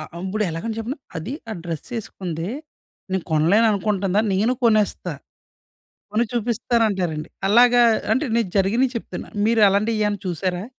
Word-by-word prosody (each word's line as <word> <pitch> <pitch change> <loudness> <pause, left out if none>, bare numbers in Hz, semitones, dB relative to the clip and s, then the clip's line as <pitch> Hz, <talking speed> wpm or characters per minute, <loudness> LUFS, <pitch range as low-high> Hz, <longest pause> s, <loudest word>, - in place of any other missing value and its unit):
అ - - -5 0.2
అంబుడు 190 +4 -2
ఎలాగని 215 +8 -4
చెప్పనా, 245 +6 -4 0.2
అది, 170 +11 -5 0.2
ఆ - - -2
డ్రెస్సేసుకుందే, 175 0 -5 0.6
నేను 190 -2 -1
కొనలేననుకుంటుందా! 200 +3 +2
నేను 220 +6 +2
కొనేస్తా. 215 -3 +2 1.0
కొని 230 +3 +2
చూపిస్తానంటారండి. 215 -8 0 0.2
అలాగా, 240 +2 +6 0.3
అంటే 280 +4 +1
నేను 225 -5 +1
జరిగినియి 230 +7 +2
చెప్తున్నా. - - -6 0.2
మీరలాంటియి 215 0 +3
ఏమన్నా 205 -2 -1
చూసారా? 180 +2 -2
210 Hz, 115 wpm, -22 LUFS, 185-230 Hz, 1.0 s, అలాగా